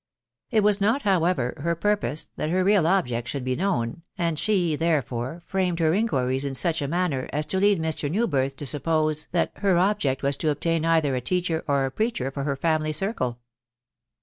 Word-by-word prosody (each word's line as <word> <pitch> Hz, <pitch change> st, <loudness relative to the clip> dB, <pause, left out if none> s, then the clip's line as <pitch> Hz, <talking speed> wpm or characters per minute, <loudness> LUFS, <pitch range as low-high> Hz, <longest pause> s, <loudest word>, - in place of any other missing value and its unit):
It 220 Hz, -3 st, +2 dB
was 205 Hz, -1 st, +3 dB
not, 225 Hz, +8 st, +2 dB
however, 170 Hz, -, +1 dB
her 170 Hz, +3 st, 0 dB
purpose 205 Hz, -4 st, -1 dB
that 155 Hz, -, -2 dB
her 185 Hz, +2 st, +1 dB
real 195 Hz, -4 st, +3 dB
object 125 Hz, -11 st, 0 dB
should 130 Hz, 0 st, -4 dB
he 130 Hz, 0 st, 0 dB
known, 165 Hz, -7 st, -1 dB, 0.2 s
and 165 Hz, -3 st, -1 dB
she, 180 Hz, -7 st, +1 dB
therefore, 145 Hz, -1 st, -1 dB
framed 185 Hz, -3 st, -1 dB
her 160 Hz, -1 st, +2 dB
inquiries 135 Hz, -, 0 dB
in 140 Hz, -1 st, -3 dB
such 165 Hz, +3 st, +2 dB
a 140 Hz, -, -1 dB
manner 160 Hz, -5 st, -1 dB
as 150 Hz, +1 st, -1 dB
to 190 Hz, +5 st, -1 dB
lead 200 Hz, -2 st, +3 dB
Mr. 160 Hz, -2 st, -1 dB
Newbhth 140 Hz, -, 0 dB
to 145 Hz, -, -6 dB
suppose 155 Hz, +2 st, 0 dB
that 170 Hz, -, +1 dB
her 195 Hz, -3 st, +2 dB
object 175 Hz, -9 st, +1 dB
was 140 Hz, 0 st, +1 dB
to 155 Hz, -, 0 dB
obtain 165 Hz, +2 st, 0 dB
either 160 Hz, -4 st, +2 dB
a 125 Hz, -, -2 dB
teacher 170 Hz, +3 st, -1 dB
or 140 Hz, -2 st, +2 dB
a 135 Hz, -, -3 dB
preacher 175 Hz, -, -1 dB
for 140 Hz, 0 st, -4 dB
her 140 Hz, -2 st, 0 dB
family 155 Hz, +1 st, 0 dB
circle. 150 Hz, -, -2 dB
160 Hz, 195 wpm, -25 LUFS, 140-185 Hz, 0.2 s, was